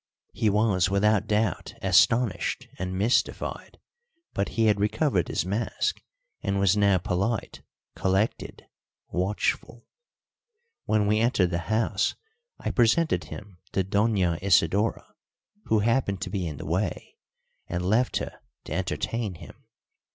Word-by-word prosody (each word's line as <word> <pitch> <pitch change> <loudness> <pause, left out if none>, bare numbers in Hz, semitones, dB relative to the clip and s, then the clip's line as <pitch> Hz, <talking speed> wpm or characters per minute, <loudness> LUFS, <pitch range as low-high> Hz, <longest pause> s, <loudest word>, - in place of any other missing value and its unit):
He 110 - +1
was 100 -3 +2
without 105 +1 +2
doubt 105 -3 -1
astonished 115 -5 +2
and 95 0 -3
mystified, 110 +6 -1 0.6
but 100 - -1
he 115 - +4
had 105 -2 +3
recovered 105 - +1
his - - -1
mask, 105 +5 -1 0.4
and 100 -1 -1
was 100 0 +4
now 100 -2 +4
polite, 95 +6 -2 0.3
collected, 95 +3 -1 0.4
watchful. 105 +5 -2 1.0
When 110 -1 +2
we 105 +1 +2
entered 110 -6 +2
the 85 - 0
house 110 -2 +1 0.4
I - - -3
presented 130 +8 +2
him 100 -4 -10
to 95 - +1
Doña 95 -4 +1
Isidora, 100 +3 +2 0.6
who 110 -1 +2
happened 115 -3 +1
to - - -4
be 95 -4 -2
in 75 -3 -6
the - - -7
way, 90 +2 -2 0.5
and 90 +1 -3
left 115 +7 +2
her - - -5 0.2
to - - -6
entertain 95 +2 -2
him. - - -14
100 Hz, 130 wpm, -26 LUFS, 95-110 Hz, 1.0 s, he